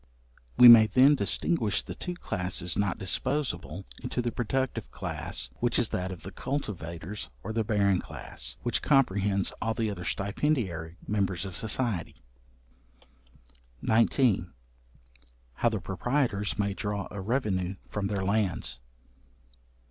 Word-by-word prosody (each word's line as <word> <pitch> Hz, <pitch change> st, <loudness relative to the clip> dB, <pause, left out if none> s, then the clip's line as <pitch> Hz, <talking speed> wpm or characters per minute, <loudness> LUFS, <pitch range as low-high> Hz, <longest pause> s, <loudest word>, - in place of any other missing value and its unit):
We 125 Hz, -, +10 dB
may 115 Hz, -2 st, +10 dB
then 130 Hz, +7 st, +6 dB
distinguish 115 Hz, -, +1 dB
the -, -, -6 dB
two 180 Hz, -1 st, -5 dB
classes 90 Hz, -, -2 dB
not 100 Hz, -3 st, 0 dB
disposable 95 Hz, -, -2 dB, 0.2 s
into -, -, -3 dB
the 120 Hz, -1 st, 0 dB
productive 130 Hz, +3 st, -2 dB
class, -, -, -4 dB
which 120 Hz, -1 st, +1 dB
is 120 Hz, -, +2 dB
that 90 Hz, +1 st, -2 dB
of 90 Hz, -, -8 dB
the 95 Hz, -, -7 dB
cultivators, 95 Hz, -, -5 dB
or -, -, -4 dB
the 115 Hz, 0 st, +1 dB
barren 100 Hz, -3 st, +2 dB
class, -, -, -6 dB
which 120 Hz, -, 0 dB
comprehends 100 Hz, -8 st, +2 dB
all 115 Hz, 0 st, 0 dB
the 110 Hz, -1 st, 0 dB
other 90 Hz, -3 st, -6 dB
stipendiary 100 Hz, -, -1 dB
members 100 Hz, -3 st, 0 dB
of 95 Hz, -3 st, -7 dB
society. 110 Hz, -3 st, -1 dB, 1.7 s
§19. 110 Hz, -4 st, +3 dB, 1.0 s
How 120 Hz, -, +2 dB
the 110 Hz, -2 st, -2 dB
proprietors 105 Hz, +2 st, -1 dB
may 100 Hz, -1 st, 0 dB
draw 100 Hz, -1 st, -3 dB
a 100 Hz, -, -5 dB
revenue 100 Hz, -5 st, -1 dB
from 100 Hz, -1 st, -2 dB
their 100 Hz, -2 st, -2 dB
lands. 100 Hz, -, 0 dB
105 Hz, 130 wpm, -28 LUFS, 95-120 Hz, 1.7 s, We